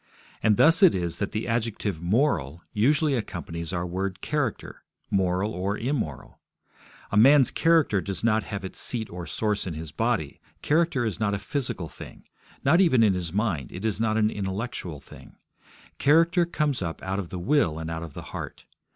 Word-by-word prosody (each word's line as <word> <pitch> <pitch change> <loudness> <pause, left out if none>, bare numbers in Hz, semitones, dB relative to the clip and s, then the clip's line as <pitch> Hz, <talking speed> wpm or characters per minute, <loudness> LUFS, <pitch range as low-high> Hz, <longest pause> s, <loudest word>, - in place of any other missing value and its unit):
And 105 -2 +3
thus 165 +2 +5
it 190 -4 +7
is 85 -2 -2
that 100 - -1
the 110 - -3
adjective 110 -6 -2
'moral' 85 - 0
usually 145 +7 +2
accompanies 85 -8 -4
our 90 -1 -2
word 95 +1 -3
'character' 145 -3 -3 0.3
moral 95 +2 +1
or 95 +3 -2
immoral. 115 - -3 0.7
A 100 - +1
man's 135 +3 +6
character 160 - +3
does 95 0 -5
not 110 -1 +3
have 100 -2 -5
its 95 - -7
seat 115 -3 -1
or 85 -1 -7
source 105 +3 -1
in 85 - -4
his 80 0 -7
body; - - -1 0.2
character 155 -5 +2
is 105 -6 -3
not 100 -2 +1
a - - -1
physical 120 - -3
thing: - - -12 0.4
not 165 +7 +5
even 130 -11 +4
in 105 -3 +4
his 90 -3 -3
mind; 95 - -1
it 95 +4 -6
is 110 0 0
not 110 -1 +1
an 110 0 +2
intellectual 95 -5 -4
thing. - - -15 0.6
Character 165 +4 +4
comes 150 -7 -1
up 80 -2 -4
out 95 +1 -2
of 90 -4 -5
the 95 - -5
will 90 - +1
and 80 0 -5
out 80 0 -4
of 80 -4 -8
the - - -7
heart. - - -7
105 Hz, 185 wpm, -26 LUFS, 90-130 Hz, 0.7 s, it